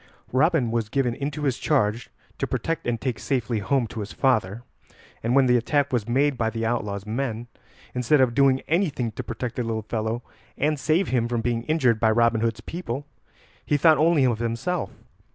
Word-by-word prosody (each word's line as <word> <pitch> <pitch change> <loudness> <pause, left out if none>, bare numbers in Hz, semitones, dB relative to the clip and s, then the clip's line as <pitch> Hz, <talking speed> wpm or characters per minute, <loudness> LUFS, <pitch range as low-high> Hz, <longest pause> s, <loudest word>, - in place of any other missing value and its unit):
Robin 135 -2 +2
was 115 -2 -1
given 125 -1 0
into 145 +3 -4
his 135 -4 0
charge 120 -6 0 0.3
to - - -1
protect 165 -5 -2
and 120 -1 0
take 125 -3 -3
safely 120 -4 -1
home 125 +5 +1
to 110 0 -7
his 105 -1 -5
father, 115 -4 0 0.6
and 120 +3 0
when 135 -1 +5
the 125 -1 +4
attack 140 +3 0
was 120 -2 0
made 135 +2 +2
by 115 -1 +1
the 115 0 -3
outlaw's 105 -4 -2
men, 115 0 -3 0.5
instead 125 +4 +2
of 130 -2 +3
doing 135 0 +3
anything 155 - 0
to - - -5
protect 120 +1 -5
the 125 - 0
little 110 -1 -3
fellow 110 +2 -3 0.3
and 150 +1 0
save 160 +6 +1
him 120 -3 +1
from 120 -1 -1
being 115 0 -1
injured 130 -8 +2
by 110 - +3
Robin 115 0 +3
Hood's 115 0 -1
people, 145 -2 -5 0.6
he 145 - +1
thought 155 +1 +5
only 155 -3 +4
of 120 -3 +1
himself. 120 +10 -2
120 Hz, 190 wpm, -24 LUFS, 115-140 Hz, 0.6 s, when